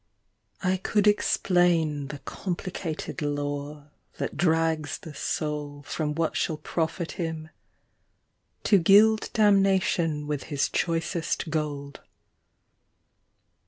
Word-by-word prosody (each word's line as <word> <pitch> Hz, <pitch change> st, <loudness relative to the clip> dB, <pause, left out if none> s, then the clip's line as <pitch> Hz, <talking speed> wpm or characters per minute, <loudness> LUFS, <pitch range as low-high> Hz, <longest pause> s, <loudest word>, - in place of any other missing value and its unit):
I 185 Hz, 0 st, +2 dB
COULD 205 Hz, +2 st, +1 dB
explain 175 Hz, -7 st, +2 dB
The 145 Hz, +1 st, -6 dB
complicated 175 Hz, -1 st, -5 dB
lore 145 Hz, 0 st, -3 dB, 0.3 s
that -, -, -3 dB
drags 160 Hz, -3 st, +1 dB
the 160 Hz, -, -10 dB
soul 145 Hz, -1 st, -3 dB
From 150 Hz, 0 st, -3 dB
what 165 Hz, 0 st, 0 dB
shall 160 Hz, -, 0 dB
profit 165 Hz, +2 st, -2 dB
him 160 Hz, -2 st, -4 dB, 1.1 s
To 200 Hz, -, +5 dB
gild 210 Hz, +5 st, +5 dB
damnation 190 Hz, -7 st, +3 dB
with 150 Hz, -2 st, -3 dB
his 145 Hz, -3 st, 0 dB
choicest 165 Hz, -1 st, -1 dB
gold. 145 Hz, -3 st, -3 dB
160 Hz, 95 wpm, -27 LUFS, 150-180 Hz, 1.1 s, To